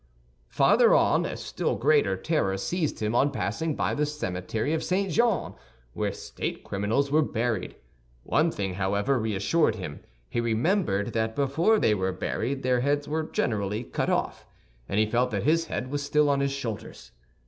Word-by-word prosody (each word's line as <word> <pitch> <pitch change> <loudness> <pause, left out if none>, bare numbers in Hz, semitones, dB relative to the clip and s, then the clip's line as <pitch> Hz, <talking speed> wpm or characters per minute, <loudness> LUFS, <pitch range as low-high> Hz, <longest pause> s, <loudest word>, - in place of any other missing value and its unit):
Farther - - +5
on, - - +3
a - - -5
still - - -2
greater 140 -8 +2
terror 95 - 0
seized 160 - -2
him 105 +1 0
on 135 +4 +3
passing 135 - -2
by - - 0
the 150 0 0
cemetery 110 - -3
of 160 - -1
St. 190 +1 0
Jean, 230 +1 +1 0.4
where - - -1
state - - -5
criminals 110 +8 -1
were 155 +2 +4
buried. 115 -8 -2 0.5
One - - +2
thing, 95 -2 -3
however, 100 +8 0
reassured 110 - +1
him; 90 -8 -6 0.3
he 120 - -1
remembered 115 - 0
that 110 0 -1
before 160 +10 +2
they 110 - +3
were 95 -2 0
buried 135 +8 -3
their 125 -1 +2
heads 145 +3 0
were 155 +1 -1
generally 105 0 -1
cut - - -2
off, - - -1 0.4
and 100 - -1
he 110 - +4
felt 120 +4 +1
that - - -2
his 165 +2 +2
head 130 -4 -4
was 145 0 -1
still 145 0 +3
on 140 - +1
his 140 0 0
shoulders. 120 -6 -6
125 Hz, 170 wpm, -27 LUFS, 105-150 Hz, 0.5 s, Farther